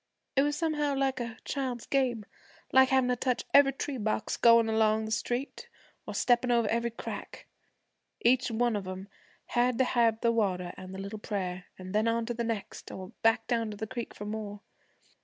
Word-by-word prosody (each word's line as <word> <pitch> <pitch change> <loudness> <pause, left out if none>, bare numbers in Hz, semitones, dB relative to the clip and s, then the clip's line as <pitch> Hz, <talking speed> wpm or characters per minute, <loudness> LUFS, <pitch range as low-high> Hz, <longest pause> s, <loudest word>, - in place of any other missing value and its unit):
It 270 - +5
was 290 +1 +1
somehow 295 -3 0
like 270 -1 0
a 235 -2 -5
child's 255 -4 -3
game 250 -6 0 0.5
like 265 0 +7
havin' 260 -1 +3
to 250 - +2
touch 250 0 -1
every 280 -1 +7
tree 275 0 -4
box 215 0 -1
goin' 230 -1 +6
along 220 0 +2
the 220 - -5
street, 245 +5 -3 0.4
or - - -5
steppin' 245 0 +2
over 235 -2 +3
every 235 +1 +1
crack. 230 - -7 0.7
Each 250 +1 +3
one 235 0 +1
of 200 -2 -4
'em 190 +2 -6 0.4
had 245 0 +2
to 260 - +4
have 230 -3 +2
the 235 - +3
water 185 -6 0
an' 185 0 -9
the - - -6
little 200 +2 -6
prayer, 185 -4 -4
an' 185 0 -8
then 215 +3 +2
on 230 0 +1
to 240 - -2
the 235 0 -2
next, 225 -3 -4
or 185 -1 -7
back 225 0 +3
down 230 -2 0
to 210 - -7
the 220 - -3
creek 240 +1 -6
for 205 - -7
more. 210 -1 -5
230 Hz, 195 wpm, -29 LUFS, 215-250 Hz, 0.7 s, like